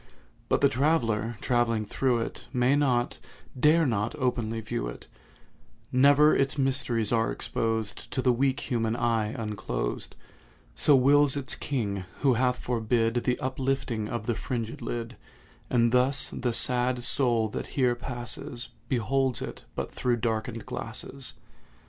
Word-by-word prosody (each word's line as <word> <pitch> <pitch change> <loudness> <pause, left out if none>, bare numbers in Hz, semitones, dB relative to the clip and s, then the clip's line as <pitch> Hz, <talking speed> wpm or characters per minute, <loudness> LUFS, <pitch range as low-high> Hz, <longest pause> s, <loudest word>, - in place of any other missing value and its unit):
But - - +2
the 140 - +7
traveller, 120 -6 +1
travelling 115 -3 +1
through 120 +2 0
it, - - -6
May 125 +2 +3
not—dare 145 +3 +1
not 110 -3 -1
openly 120 -5 -1
view 110 - -3
it; - - -8 0.9
Never 145 +4 +6
its 135 +1 +1
mysteries 130 -5 0
are 115 -1 +2
exposed 110 -2 -2
To - - -3
the 125 - +4
weak 135 +3 +1
human 115 -3 -1
eye 115 -3 +1
unclosed; 105 - -4 0.6
So 145 - +4
wills 145 +2 +5
its 130 -2 -3
King, 100 -9 -2 0.2
who 135 -3 +4
hath 125 +1 +1
forbid 115 -1 0
The 125 - +1
uplifting 130 -4 -2
of 120 -2 -4
the 120 - 0
fringèd 115 -1 -4
lid; 120 0 -4 0.5
And 120 -2 +3
thus 135 +2 +2
the 120 -1 -2
sad 125 +1 +2
Soul 120 -4 +2
that - - -5
here 125 -3 +3
passes 120 0 -6 0.2
Beholds 130 0 +1
it - - -7
but - - -3
through 125 -1 0
darkened 115 0 -2
glasses. 130 - -5
120 Hz, 135 wpm, -27 LUFS, 115-130 Hz, 0.9 s, the